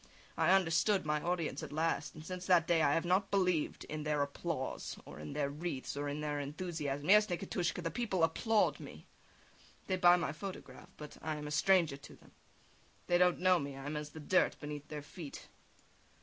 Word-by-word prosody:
I 165 +1 +2
understood 190 +1 +3
my 150 0 0
audience 170 -5 -2
at - - -7
last, 155 -1 -1
and 155 0 -10
since 180 0 -6
that 175 -3 +5
day 170 -1 +3
I 140 -2 +4
have 165 - 0
not 190 +3 +2
believed 180 -6 +1
in 155 0 -5
their 150 -1 +1
applause, 140 -1 -4
or 70 +1 -10
in 75 0 -7
their 145 -2 0
wreathes, 150 -3 -4
or 145 0 -2
in 145 +1 -4
their 150 -1 -2
enthusiasm. 145 -1 -4
Yes, 210 +2 +6
Nikitushka! 175 -1 -2
The 165 - -2
people 190 -3 -1
applaud 215 +7 +2
me, - - -10 0.8
they 185 - 0
buy 175 -1 +7
my 175 - -1
photograph, 190 +4 -8
but 150 -1 -9
I 155 -1 -2
am 150 0 -6
a 150 - -5
stranger 165 -2 +3
to 140 - -13
them. - - -20 0.7
They 175 0 +3
don't 180 0 +4
know 185 -1 +4
me, 140 -2 -5
I 135 - -8
am 150 +1 -3
as 150 0 -4
the 160 - -10
dirt 170 +5 +2
beneath 145 0 -6
their 150 -2 -6
feet. 145 -1 -9
160 Hz, 200 wpm, -34 LUFS, 150-180 Hz, 0.8 s, buy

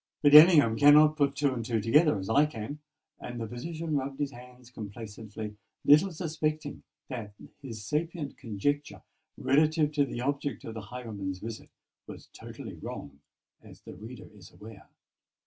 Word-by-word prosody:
But 145 -1 +5
Ellingham 150 -7 +8
cannot 150 +1 +7
put 140 -2 +1
two 140 -2 +1
and 120 -2 -4
two 115 0 -1
together 150 +5 +3
as 95 0 -6
I 145 +6 +4
can:"—and 145 -1 -9
the 115 - -4
physician 155 +7 -5
rubbed 135 0 -4
his 145 -1 -1
hands 125 0 -14
complacently, 105 -1 -8 0.3
little 155 +7 +6
suspecting 155 -3 -3 0.3
that 110 -6 -7 0.3
his 115 -6 -8
sapient 155 - -3
conjecture 140 +5 -3 0.3
relative 150 +2 +2
to 145 -1 +2
the 120 - -6
object 140 -3 -2
of 115 - -7
the 110 - -6
highwayman's 100 -4 -6
visit 110 +3 -8 0.4
was - - -11
totally - - -9
wrong, 70 0 -8 0.4
as - - -16
the - - -11
reader 110 +5 -10
is 95 -4 -15
aware. 105 -1 -13
130 Hz, 150 wpm, -29 LUFS, 110-150 Hz, 0.4 s, Ellingham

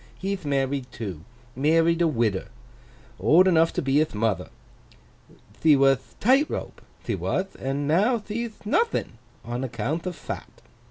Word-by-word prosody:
He'th 190 -2 -4
married 135 -2 -1
too. 95 -9 -6 0.3
Married 165 +5 +3
a 170 - +4
widder. 115 -9 0 0.7
Old 155 - +5
enough 165 -2 +4
to - - -2
be 135 +1 +2
hith 155 -7 0
mother. 110 -1 -1 1.1
Thee 155 -2 +6
wath 135 -1 +2
Tightrope, 270 +7 +1 0.2
thee - - -1
wath, 190 +1 -2
and 140 +2 -2
now 205 - +3
thee'th 220 0 -6
nothing—on 205 - -2
accounth 130 - -3
of 180 - -4
fat. - - -8
155 Hz, 130 wpm, -25 LUFS, 130-185 Hz, 1.1 s, Thee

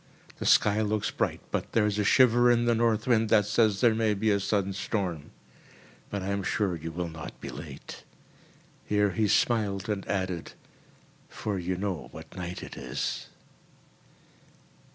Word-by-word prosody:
The - - -3
sky 105 +1 +4
looks 105 -1 0
bright - - -1
but - - -3
there 110 -2 +3
is 105 0 0
a - - +2
shiver 120 +2 +5
in 120 0 +3
the 120 - +3
north 115 -1 +1
wind 115 -3 +3
that 105 -2 +5
says 105 -1 +2
there 120 -3 +5
may 110 -1 +1
be 110 +2 +1
a 100 - +2
sudden 100 -1 0
storm. 95 -6 -3 0.8
But 100 -2 -3
I 95 - -3
am 100 0 0
sure 100 -2 0
you 80 0 -6
will 85 +1 -3
not 80 -1 -9
be - - -7
late." - - -9 0.8
Here 105 -1 +2
he 105 +4 +1
smiled, 105 -2 +1
and 100 -2 -2
added, 95 -4 -2 0.8
"for 100 -3 -3
you 90 +1 -2
know 90 -9 -3
what 80 +1 -11
night 90 -1 -5
it - - -8
is." - - -3
105 Hz, 170 wpm, -28 LUFS, 95-110 Hz, 0.8 s, shiver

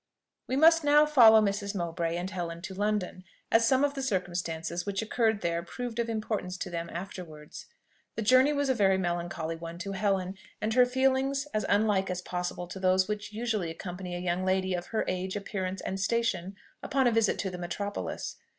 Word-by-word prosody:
We 260 - -1
must 325 +3 +6
now 295 +1 +6
follow 230 -7 +7
Mrs. 200 0 -1
Mowbray 170 -2 -2
and 175 +1 -3
Helen 170 -3 -5
to 190 - -6
London, 205 -2 -1 0.3
as 230 0 +5
some 260 +3 +3
of 285 -1 +2
the 275 - -4
circumstances 175 -6 -2
which 200 +1 -2
occurred 220 -1 +1
there 170 0 0
proved 235 +6 -6
of 235 0 0
importance 215 -4 -3
to 185 - -5
them 170 0 -4
afterwards. 170 -4 -8 0.5
The 225 - -2
journey 255 +6 +5
was 285 -1 0
a 260 - +3
very 195 -5 +3
melancholy 175 -2 -2
one 165 +1 -7
to 195 +3 -5
Helen, 195 -1 -1 0.2
and 215 +1 -1
her 250 +1 +5
feelings 265 +2 +1
as 215 - -1
unlike 200 -2 +2
as 180 0 -3
possible 180 0 -3
to 190 - -7
those 185 0 +3
which 210 -1 -4
usually 215 -5 -2
accompany 180 +2 -6
a - - -3
young 180 +1 -1
lady 190 0 +1
of 175 -1 -3
her 220 - -1
age, 185 +1 -2
appearance, 195 -2 -3
and 190 - -4
station, 200 -3 0 0.3
upon 270 -1 +1
a 240 - +4
visit 225 -2 +2
to 190 - -2
the 180 - -7
metropolis. 200 +4 -4
195 Hz, 195 wpm, -29 LUFS, 180-225 Hz, 0.5 s, follow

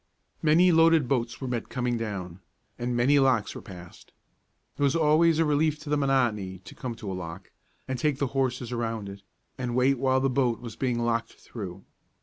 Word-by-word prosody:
Many 165 +4 +5
loaded 165 -4 +5
boats 120 -3 -1
were 130 - -4
met 120 -2 -3
coming 125 -2 -1
down, 95 -6 -5 0.4
and 120 0 -2
many 140 +4 +4
locks 130 -6 +2
were - - -8
passed. 90 -3 -12 0.6
It - - -8
was 140 +1 +3
always 160 +1 +4
a 165 - +3
relief 150 +1 +2
to 150 -1 -7
the - - +4
monotony 120 -9 +1
to - - -10
come 125 -2 -5
to 105 -4 -6
a - - -3
lock, 85 -3 -7 0.4
and 130 -1 -3
take 150 0 +1
the 140 - 0
horses 125 -2 -1
around 115 -4 -3
it, 100 0 -10 0.4
and 125 -2 -2
wait 130 +1 +3
while 130 0 +2
the 135 - +1
boat 125 -3 +1
was 115 -3 -8
being 125 -3 -1
locked 115 -1 -1
through. 95 -4 -9
125 Hz, 195 wpm, -27 LUFS, 115-140 Hz, 0.6 s, Many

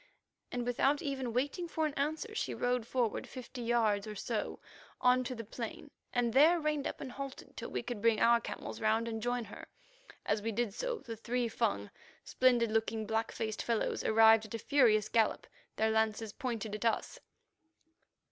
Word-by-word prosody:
And 245 -1 -2
without 270 +5 +2
even 265 -4 -2
waiting 285 +9 -1
for 320 -1 -1
an 300 - -1
answer, 310 +11 -2
she - - -2
rode 245 -2 0
forward 240 -4 -1
fifty 255 0 -8
yards 225 -4 +1
or 210 - -6
so 220 +2 -3 0.4
on 250 0 +4
to 255 +1 -3
the 230 - -6
plain, 230 +6 -7 0.2
and 240 -2 +1
there 315 +6 +6
reined 300 -2 0
up - - -6
and 260 - -6
halted 275 0 -8
till - - -6
we - - -3
could 240 -4 -5
bring 230 -1 +3
our 235 0 +5
camels - - -6
round 220 +1 +2
and 225 -1 -3
join 245 +1 -1
her. 200 - -10 0.6
As 210 - +1
we 225 +2 -2
did 225 -1 -1
so, - - -2
the 230 - -7
three 240 +2 -1
Fung, 100 - -1 0.3
splendid 240 -3 +3
looking, 220 0 0
black 225 +1 -1
faced 220 -1 -3
fellows, 230 -2 -1
arrived 220 0 +6
at 215 - -6
a - - -1
furious 225 -5 +3
gallop, 225 -2 +1 0.3
their 220 0 +2
lances 220 -1 0
pointed 230 -4 -4
at 210 - -4
us. 225 - 0
235 Hz, 185 wpm, -33 LUFS, 220-255 Hz, 0.6 s, there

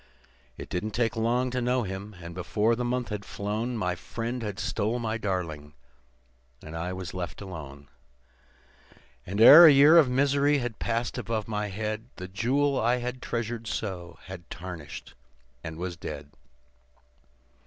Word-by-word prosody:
"It - - -7
didn't 105 +4 -3
take 115 -1 +1
long 120 +3 +1
to 125 0 -1
know 125 +1 +1
him, 100 +1 -6
and 85 0 -8
before 105 +6 +1
the 125 - -3
month 125 0 -1
had 105 -2 -4
flown 110 +5 -3
My 90 -4 0
friend 115 +7 -5
had 105 -4 -4
stole 110 +3 -1
my 115 -1 -2
darling, 80 -8 -4 0.9
and 80 - -8
I 85 +2 -3
was 95 -1 -6
left 85 -4 -5
alone; 75 -8 -9 1.4
And 100 +3 -3
ere 150 +9 +11
a - - +9
year 145 +4 +7
of 145 -6 +4
misery 140 +2 +3
had 120 -4 -4
passed 115 +1 -2
above 110 -2 -3
my 105 -1 -2
head, 110 +2 -4
The 90 - -7
jewel 130 +8 +1
I 120 +2 +3
had 125 +1 -5
treasured 115 -1 -3
so 90 -6 -4
had 90 -2 -10
tarnished 90 -2 -8 0.5
and 80 -1 -6
was 90 0 -4
dead. 75 -3 -7
110 Hz, 155 wpm, -27 LUFS, 90-120 Hz, 1.4 s, ere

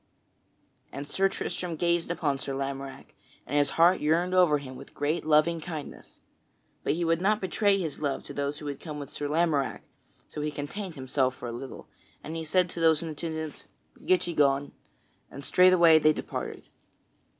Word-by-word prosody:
And 140 +2 -6
Sir 195 +4 +2
Tristram 180 -3 -4
gazed 170 +1 +1
upon 145 -5 -1
Sir 135 0 -4
Lamorack 135 0 -5 0.3
and 145 - -4
his 145 -1 +3
heart 170 +3 +6
yearned 170 +4 +2
over 180 -5 +5
him 130 -2 -9
with 135 +2 -12
great 155 +2 -1
loving 160 +2 +3
kindness. 155 -3 -8 0.6
But - - +1
he 170 +2 -1
would 165 +1 +1
not 210 +2 +2
betray 200 +1 +2
his 160 -7 -4
love 140 -3 -2
to - - -8
those 140 +1 -2
who 150 - -9
had 145 -1 -4
come 150 -3 -7
with 145 -1 -7
Sir 145 - -4
Lamorack, 150 -3 0 0.4
so 150 - -6
he 150 - -1
contained 165 +5 -6
himself 130 -1 0
for 125 - -7
a - - -4
little, 125 +3 -8 0.4
and 160 - -6
he 165 - -3
said 180 +3 +2
to - - -6
those 160 -1 +4
in 165 - -4
attendance, 160 -1 -5 0.4
"Get 185 0 +3
ye 175 - -3
gone," 140 -2 +2 0.6
and 140 - -10
straightway 175 -3 +6
they 155 0 +4
departed. - - -6
155 Hz, 185 wpm, -28 LUFS, 140-170 Hz, 0.6 s, heart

